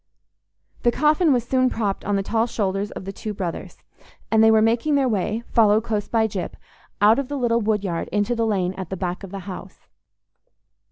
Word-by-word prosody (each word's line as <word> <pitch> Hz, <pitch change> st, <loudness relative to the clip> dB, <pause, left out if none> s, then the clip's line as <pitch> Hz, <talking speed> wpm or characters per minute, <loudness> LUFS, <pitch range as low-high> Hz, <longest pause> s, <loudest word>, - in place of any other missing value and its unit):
The 240 Hz, -, +3 dB
coffin 305 Hz, +4 st, +3 dB
was 245 Hz, -3 st, +2 dB
soon 255 Hz, +1 st, +2 dB
propped 210 Hz, -5 st, -2 dB
on 205 Hz, -, 0 dB
the 195 Hz, -, 0 dB
tall 225 Hz, +3 st, 0 dB
shoulders 200 Hz, -2 st, -2 dB
of 185 Hz, -, -8 dB
the 195 Hz, -, -5 dB
two 210 Hz, +1 st, -6 dB
brothers, 180 Hz, -4 st, -6 dB, 0.5 s
and 220 Hz, 0 st, +5 dB
they 220 Hz, -, +7 dB
were 220 Hz, 0 st, +5 dB
making 230 Hz, +7 st, +2 dB
their 275 Hz, -2 st, +2 dB
way, 215 Hz, +1 st, -1 dB
followed 215 Hz, -1 st, +4 dB
close 215 Hz, -3 st, -2 dB
by 225 Hz, -1 st, +2 dB
Gyp, 195 Hz, -4 st, -5 dB, 0.5 s
out 215 Hz, +5 st, +6 dB
of 275 Hz, -, -2 dB
the 285 Hz, -, -4 dB
little 235 Hz, -2 st, +1 dB
woodyard 205 Hz, -5 st, -1 dB
into 205 Hz, +3 st, 0 dB
the 230 Hz, -1 st, 0 dB
lane 190 Hz, -4 st, 0 dB
at 185 Hz, -2 st, -5 dB
the 190 Hz, -, -4 dB
back 180 Hz, 0 st, -3 dB
of 195 Hz, -, -7 dB
the 195 Hz, +1 st, -7 dB
house. 190 Hz, -2 st, -9 dB
220 Hz, 205 wpm, -23 LUFS, 195-235 Hz, 0.5 s, they